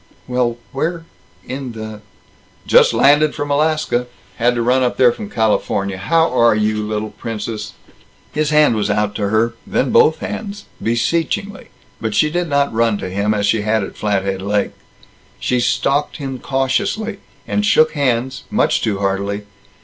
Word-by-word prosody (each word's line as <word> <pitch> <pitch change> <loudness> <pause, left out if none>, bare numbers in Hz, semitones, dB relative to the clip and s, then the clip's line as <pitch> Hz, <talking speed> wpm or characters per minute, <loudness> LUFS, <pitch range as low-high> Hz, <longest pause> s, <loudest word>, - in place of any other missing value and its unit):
"Well 125 -2 0
where 165 +4 -2 0.4
in 130 -2 -5
the 110 -1 -7 0.3
" - - -33
"Just - - +7
landed 145 +2 +4
from 145 0 -3
Alaska. 150 -4 +1 0.3
Had 120 +1 +2
to 120 - 0
run 125 +2 +3
up 125 -1 0
there 125 -2 +6
from 205 - -7
California. 100 - 0
How 165 - +2
are 115 -2 +5
you, 105 0 0
little 105 0 -3
princess?" 110 -1 -5 0.6
His 150 -1 0
hand 150 -5 +4
was 105 -1 -1
out 105 0 0
to 100 -2 -2
her, 110 +2 +2
then 130 - 0
both 160 - +5
hands, 205 -1 -6 0.2
beseechingly, 165 - -1 0.3
but 110 -2 -2
she 150 - +3
did 175 +1 -1
not 140 -2 +1
run 115 -2 +2
to 95 -2 -5
him, 100 +3 0
as 105 -1 0
she 105 +1 +2
had 110 0 +1
at - - -7
Flathead 95 -2 -1
Lake. 100 +1 0 0.7
She 125 - 0
stalked 135 +5 0
him 135 -4 -5
cautiously, 140 - -1 0.3
and 210 - 0
shook 160 -6 +4
hands 130 -4 -1
much - - +1
too 105 -3 0
heartily. 100 +1 -1
120 Hz, 165 wpm, -18 LUFS, 105-145 Hz, 0.7 s, Just